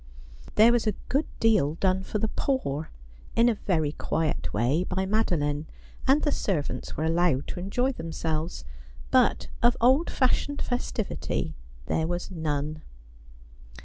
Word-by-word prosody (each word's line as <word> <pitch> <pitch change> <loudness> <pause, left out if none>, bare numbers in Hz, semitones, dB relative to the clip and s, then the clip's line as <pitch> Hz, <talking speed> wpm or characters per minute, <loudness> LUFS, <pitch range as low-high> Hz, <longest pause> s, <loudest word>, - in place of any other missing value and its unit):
There 220 +2 +7
was 235 -2 +1
a 210 - +1
good 280 +4 +1
deal 205 -10 +3
done 185 +1 +1
for 200 - -3
the 220 - 0
poor, 160 - -1 0.5
in 230 +2 +5
a - - +3
very 165 -8 0
quiet 155 0 -2
way, 125 - +1
by 190 +1 -1
Madeline, 155 -8 0 0.4
and 280 +3 +4
the 295 - +2
servants 150 - -2
were 155 - -1
allowed 165 -4 +2
to - - -4
enjoy 245 +8 0
themselves; 160 - -3 0.5
but - - +3
of 240 +1 +4
old 260 +7 +4
fashioned 280 +2 +1
festivity 245 -3 -2 0.3
there 160 - 0
was 175 +2 -3
none. 155 -2 -2
185 Hz, 140 wpm, -27 LUFS, 155-230 Hz, 0.5 s, There